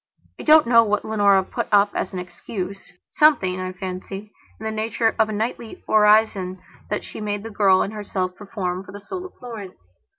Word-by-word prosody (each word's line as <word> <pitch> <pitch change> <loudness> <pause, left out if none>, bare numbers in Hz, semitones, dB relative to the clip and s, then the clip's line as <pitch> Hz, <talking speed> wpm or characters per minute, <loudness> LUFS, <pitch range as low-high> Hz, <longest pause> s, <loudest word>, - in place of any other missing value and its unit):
I - - -5
don't 310 0 +7
know 230 -1 +6
what 210 -1 -1
Leonora 200 -3 +3
put - - -4
up 205 0 +5
as - - -2
an 185 - -6
excusesomething, 185 - -1
I 185 0 -3
fancy, 190 +3 -7 0.3
in - - -10
the 220 - -1
nature 225 +1 0
of 220 -1 +3
a - - -3
nightly 220 +1 -4
orison 210 -3 +3 0.3
that 210 - -2
she - - -8
made 205 -1 -3
the 225 - -7
girl 195 -2 +4
and 205 - -5
herself 190 -3 -3
perform 190 -3 -4
for 190 - -13
the 205 - -8
soul 365 - -6
of - - -22
Florence. 195 - -10
205 Hz, 190 wpm, -22 LUFS, 185-220 Hz, 0.3 s, don't